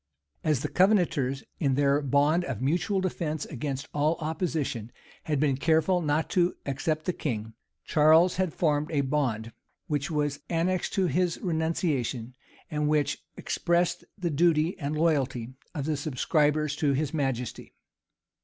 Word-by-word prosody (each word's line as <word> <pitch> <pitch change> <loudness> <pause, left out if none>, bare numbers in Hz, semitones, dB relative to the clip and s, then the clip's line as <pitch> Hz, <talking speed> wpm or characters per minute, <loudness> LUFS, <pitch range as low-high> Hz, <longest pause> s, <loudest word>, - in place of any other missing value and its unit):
As 150 -5 +1
the - - -1
Covenanters, 175 -9 +2 0.2
in 135 -4 +2
their 140 +1 +3
bond 145 +5 +2
of 130 -6 -4
mutual 175 - +1
defence 160 -5 -2
against 140 -1 -4
all 150 +3 +2
opposition, 155 - -2 0.3
had 150 -3 0
been 140 -3 +2
careful 160 +5 +2
not 150 0 +1
to 180 -2 +2
except 155 +3 -1
the 180 - 0
king, 110 -8 -4 0.3
Charles 160 +4 +5
had 185 -3 +1
formed 150 -3 0
a 150 -3 +1
bond, 130 -6 -1 0.3
which 145 -1 -2
was 145 -2 -1
annexed 175 +2 0
to 190 -2 +2
this 175 +2 +1
renunciation, 160 - -1 0.4
and 150 -1 0
which 150 -2 +1
expressed 175 0 0
the 175 -4 -2
duty 160 +2 +3
and 150 0 -2
loyalty 135 -7 0 0.2
of 145 -3 -2
the 155 0 0
subscribers 150 +1 +1
to 145 -2 +2
his 145 +2 -1
majesty. 135 -5 -3
150 Hz, 145 wpm, -28 LUFS, 140-165 Hz, 0.4 s, Charles